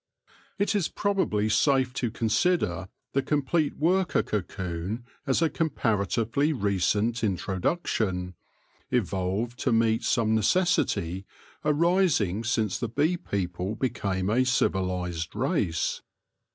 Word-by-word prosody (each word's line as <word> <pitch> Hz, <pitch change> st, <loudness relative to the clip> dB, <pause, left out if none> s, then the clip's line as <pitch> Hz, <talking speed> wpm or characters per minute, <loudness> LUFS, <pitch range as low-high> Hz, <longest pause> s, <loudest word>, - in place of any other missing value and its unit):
It 200 Hz, +2 st, +1 dB
is 200 Hz, -6 st, +1 dB
probably 190 Hz, -, 0 dB
safe 130 Hz, +3 st, +2 dB
to 125 Hz, -2 st, -1 dB
consider 110 Hz, -, 0 dB, 0.2 s
the 135 Hz, -, +2 dB
complete 150 Hz, +2 st, 0 dB
worker 180 Hz, +3 st, +2 dB
cocoon 95 Hz, +2 st, -4 dB, 0.2 s
as 135 Hz, +5 st, +2 dB
a 165 Hz, -, +3 dB
comparatively 120 Hz, -, 0 dB
recent 105 Hz, -, 0 dB
introduction, 95 Hz, -, -1 dB, 0.6 s
evolved 105 Hz, +2 st, -1 dB
to 130 Hz, -, 0 dB
meet 115 Hz, 0 st, +2 dB
some 110 Hz, -3 st, +2 dB
necessity 105 Hz, -, +1 dB, 0.4 s
arising 150 Hz, -, +2 dB
since 110 Hz, -4 st, 0 dB
the 120 Hz, -, -2 dB
bee 150 Hz, +9 st, +1 dB
people 95 Hz, -, -3 dB
became 100 Hz, -6 st, -1 dB
a 125 Hz, +3 st, +3 dB
civilised 90 Hz, -8 st, -1 dB
race. 105 Hz, -, 0 dB
115 Hz, 105 wpm, -27 LUFS, 95-145 Hz, 0.6 s, a